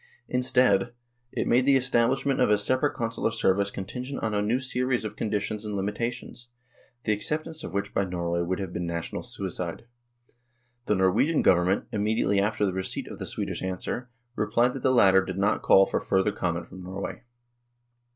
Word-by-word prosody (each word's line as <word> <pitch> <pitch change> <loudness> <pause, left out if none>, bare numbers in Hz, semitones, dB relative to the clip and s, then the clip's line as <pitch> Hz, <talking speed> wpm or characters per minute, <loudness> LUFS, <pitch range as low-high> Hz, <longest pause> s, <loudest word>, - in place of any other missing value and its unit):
Instead, 125 -4 +3 0.4
it - - -2
made 125 +2 +3
the 135 0 +5
estab 125 -2 +3
lishment 135 0 0
of - - +4
a 105 - +5
separate 130 +7 +1
Consular 115 -3 -1
service 100 -3 +1
contingent 125 +8 -6
on 110 -1 0
a 105 - +1
new 110 +4 +1
series 125 -2 -1
of 105 - -5
conditions 105 0 -2
and 105 -1 -4
limitations, 115 +4 -4 0.6
the 110 - +2
accept 150 +9 -1
ance 160 -1 -6
of - - -6
which 100 0 -3
by - - +2
Norway 85 -2 -2
would 90 +2 -1
have 95 -3 -5
been 85 0 -3
national 85 0 -4
suicide. 90 0 -5 1.0
The 105 - +3
Norwegian 95 - +2
Government, 90 +2 +3
immediately 105 -1 +1
after 105 +1 +1
the 95 - -1
receipt 95 0 -3
of - - -9
the - - -5
Swedish - - -4
answer, 95 +7 -4 0.3
replied 115 +4 +2
that 135 - -6
the 130 - +3
latter 95 -6 +5
did 95 0 -5
not 100 +2 +1
call 95 - +6
for - - -1
further 95 +2 +1
comment 85 -3 -2
from 95 - -10
Norway. 95 +2 -6
105 Hz, 180 wpm, -27 LUFS, 95-125 Hz, 1.0 s, call